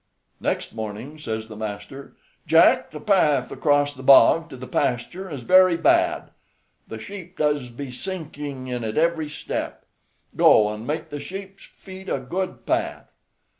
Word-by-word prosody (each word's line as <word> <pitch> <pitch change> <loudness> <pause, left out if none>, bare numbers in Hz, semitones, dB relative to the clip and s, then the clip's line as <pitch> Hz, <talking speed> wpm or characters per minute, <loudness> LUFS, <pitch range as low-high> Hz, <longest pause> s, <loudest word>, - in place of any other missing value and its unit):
Next - - -2
morning 110 +7 -7
says 110 -5 -4
the 110 - -10
master: 105 +5 -7 0.3
"Jack, - - +5
the 150 - -8
path 150 -7 +2
across 145 -1 +1
the 130 - -11
bog 145 +5 +6
to 135 - -9
the 130 - -8
pasture 130 +12 -2
is 145 -5 -6
very 185 +4 +5
bad; 165 - +2 0.6
the 110 - -7
sheep 185 - -10
does 145 -4 0
be 130 +2 -7
sinking 145 -4 -6
in 125 -2 -4
it 110 -1 -4
every 160 -1 +1
step; 150 - -5 0.5
go 105 -1 +5
and 110 +2 -8
make 160 +2 -3
the 145 -1 -6
sheep's 195 +3 -9
feet 190 0 -12
a - - 0
good 175 +9 -4
path." - - -2
145 Hz, 155 wpm, -23 LUFS, 125-170 Hz, 0.6 s, bog